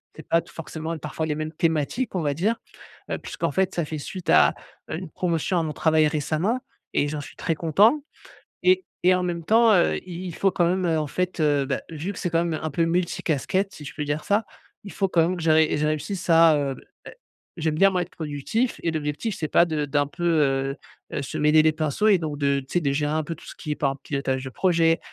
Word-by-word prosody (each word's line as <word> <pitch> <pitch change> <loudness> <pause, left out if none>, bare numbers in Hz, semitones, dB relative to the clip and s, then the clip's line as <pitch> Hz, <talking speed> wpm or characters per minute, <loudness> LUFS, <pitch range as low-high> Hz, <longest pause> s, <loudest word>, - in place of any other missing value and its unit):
c'est 155 - -12
pas 165 - +4
tout, 170 - -18
forcément, 165 0 -5
parfois, 155 +1 -4
les 150 -1 -1
mêmes 155 0 -4
thématiques, 165 - -1
on 175 - 0
va 145 -2 0
dire, 205 +10 +1 0.5
heu, - - -1
puisqu'en - - -3
fait, 190 0 +1
ça 170 -3 -1
fait 155 0 -5
suite 185 +5 -7
à, - - +6 0.4
heu, - - -2
une 180 -2 -7
promotion 170 +1 0
à - - 0
mon 155 - -2
travail 155 -1 +3
récemment 155 - 0 0.3
et 145 - +2
j'en 150 0 -4
suis - - -12
très 165 - -1
content 205 - +3 0.6
et 370 0 +4 0.2
et 185 +1 +5
en 180 - 0
même 170 -2 -3
temps, 225 +4 +5
heu, 180 -4 +3
i 180 0 -7
il 170 - -6
faut 195 - +2
quand 175 -2 +1
même, 185 +1 +1
heu, 165 -2 +2
en 150 - -1
fait 180 +5 -2
heu, 145 -2 +3
beh, 140 0 -2
vu 165 +5 -4
que - - -9
c'est 180 - -1
quand 165 +1 +2
même 165 -2 -2
un 155 - -2
peu 165 +4 +1
multi 175 +1 -1
casquettes 185 +6 0
si 150 - -10
je 140 - -8
peux 150 - -3
dire 145 +1 -2
ça, 205 +2 +2 0.4
il 200 - -9
faut 195 - 0
quand 170 -2 +3
même 180 +3 0
que 170 - -6
j'arri 155 -1 +4
je 150 - +1
réussisse 175 +6 -3
à, 165 -2 +6
heu, 140 -2 -1 0.3
è - - -9 0.4
j'aime 160 -2 -1
bien 195 +4 +5
moi 180 -1 0
être - - -7
productif 160 - -2
et 165 - +1
l'objectif 155 +7 -3
c'est 155 - -2
pas 170 - +5
de 155 -3 -1
d'un 145 0 +1
peu, 175 +3 -6
heu 135 -4 +2 0.4
heu, - - -2
se 135 - -5
mêler 150 +1 +5
les 155 - +4
pinceaux 155 +7 0
et 195 -4 +5
donc 150 -3 -4
de, 140 -1 +2
tu 130 - -15
sais, 175 - +2
de 140 -3 0
gérer 145 +1 0
un 155 - +1
peu 165 0 -5
tout - - -16
ce - - -9
qui 150 - -8
est - - -3
par 135 -2 0
pilotage 135 -2 -2
de 130 - -6
projet, 165 +1 +2
160 Hz, 255 wpm, -24 LUFS, 150-180 Hz, 0.6 s, à